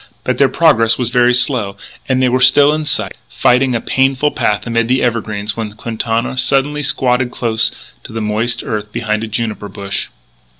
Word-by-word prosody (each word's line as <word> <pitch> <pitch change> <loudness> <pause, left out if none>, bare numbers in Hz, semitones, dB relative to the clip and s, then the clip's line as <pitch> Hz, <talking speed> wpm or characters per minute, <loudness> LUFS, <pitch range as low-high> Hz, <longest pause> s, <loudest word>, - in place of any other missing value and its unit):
But - - -1
their - - +5
progress 115 0 +3
was 120 -2 -2
very 125 -1 +4
slow; 120 -5 0 0.3
and 130 0 +2
they - - +4
were 125 +1 +1
still 140 +3 +5
in 155 0 -2
sight, - - -1
fighting 125 0 +2
a - - +1
painful 135 +4 +1
path 105 -1 -1
amid 115 -1 0
the 130 +2 +1
evergreens, 110 -3 -2
when 110 -2 -5
Quintana 115 +3 -2
suddenly 135 +3 +1
squatted 125 -3 +1
close 115 -2 0 0.4
to - - -9
the 115 - -4
moist 110 +2 -1
earth 105 -5 -4
behind 110 -1 -2
a - - -3
juniper 110 -2 -3
bush. 100 0 -4
120 Hz, 180 wpm, -15 LUFS, 110-130 Hz, 0.4 s, their